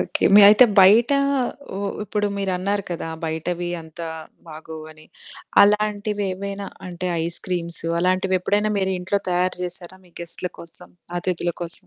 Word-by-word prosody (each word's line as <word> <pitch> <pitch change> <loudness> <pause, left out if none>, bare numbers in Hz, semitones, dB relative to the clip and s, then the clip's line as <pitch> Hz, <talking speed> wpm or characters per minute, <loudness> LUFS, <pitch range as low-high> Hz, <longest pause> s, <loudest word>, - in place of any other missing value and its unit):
Okay. - - -1
మీ 210 - +10
అయితే 215 +4 +8 0.2
బయట 215 +7 +6 0.6
హ్మ్, 200 +1 -3
ఇప్పుడు 210 0 -1
మీరన్నారు 195 +1 -1
కదా! 165 -1 -4 0.2
బయటవి 170 +2 -3
అంతా 165 +1 -8 0.4
బాగోవని. 155 0 -10 0.6
అలాంటివేవైనా 205 -1 0 0.2
అంటే 180 0 -4 0.2
ఐస్‌క్రీమ్స్ 170 0 -4 0.2
అలాంటివెప్పుడైనా 185 +3 +1
మీరు 190 0 0
ఇంట్లో 190 +3 -1
తయారు 180 +1 +1
జేశారా 180 +1 -7
మీ - - -22
గెస్ట‌ల 170 +1 -5
కోసం? 170 +1 -7 0.3
అతిథుల 175 -1 -2
కోసం? 170 0 -3
185 Hz, 120 wpm, -22 LUFS, 170-200 Hz, 0.6 s, మీ